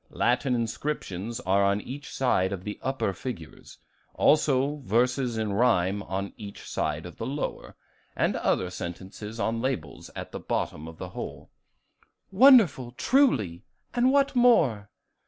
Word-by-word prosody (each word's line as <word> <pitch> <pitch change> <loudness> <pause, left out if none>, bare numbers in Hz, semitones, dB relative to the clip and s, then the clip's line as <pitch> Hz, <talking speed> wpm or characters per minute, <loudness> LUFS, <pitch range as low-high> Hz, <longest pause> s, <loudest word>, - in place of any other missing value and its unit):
Latin 125 +1 +1
inscriptions 115 -3 -3
are 100 0 +2
on 100 +1 +2
each 135 +6 -8
side 95 -8 +1
of 95 -2 -5
the 105 +1 -6
upper 130 -6 -1
figures, 90 -6 -8 0.4
also 145 -1 +3
verses 125 0 0
in 110 -2 -1
rhyme 100 -3 +2
on 100 0 -4
each 100 -2 -9
side 75 +1 -2
of 90 - -10
the 115 - -4
lower, 145 +2 -4 0.4
and - - +1
other 90 -1 0
sentences 95 +5 -7
on 115 +2 -1
labels 90 - -4
at - - -7
the - - -6
bottom 75 +2 -3
of 80 0 -10
the 90 - -6
whole." - - -8 0.8
"Wonderful 195 - +6
truly! 125 - +2 0.3
and 250 +1 +3
what 275 -1 +2
more?" 150 - +4
115 Hz, 140 wpm, -27 LUFS, 95-135 Hz, 0.8 s, Wonderful